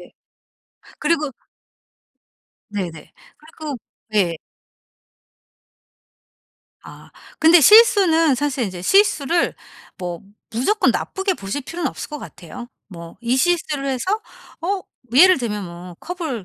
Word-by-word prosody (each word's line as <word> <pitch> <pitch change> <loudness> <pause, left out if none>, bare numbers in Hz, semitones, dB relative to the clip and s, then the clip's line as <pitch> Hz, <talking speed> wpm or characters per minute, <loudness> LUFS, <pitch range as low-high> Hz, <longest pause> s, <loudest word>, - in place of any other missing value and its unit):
에 - - -15 0.9
그리고 300 -2 0 1.4
네네. 180 -6 -6 0.2
그리고 310 -2 -8 0.4
예. 175 -5 +2 2.5
아. - - -14 0.3
근데 325 +2 +6
실수는 365 - +6
사실 275 -2 -1
이제 185 -4 -6
실수를 345 - +2 0.4
뭐 175 -2 -5 0.3
무조건 260 - +1
나쁘게 385 -1 -2
보실 200 +5 -5
필요는 335 0 -3
없을 - - -8
것 300 - -6
같아요. 180 - -10 0.2
뭐 170 -3 -11
이 240 +2 0
실수를 305 -2 0
해서 370 - -1 0.4
어 380 +3 -2 0.3
예를 365 +4 +7
들면 210 -5 -3
뭐 175 0 -10
컵을 320 - -5
285 Hz, 205 characters per minute, -20 LUFS, 205-345 Hz, 2.5 s, 예를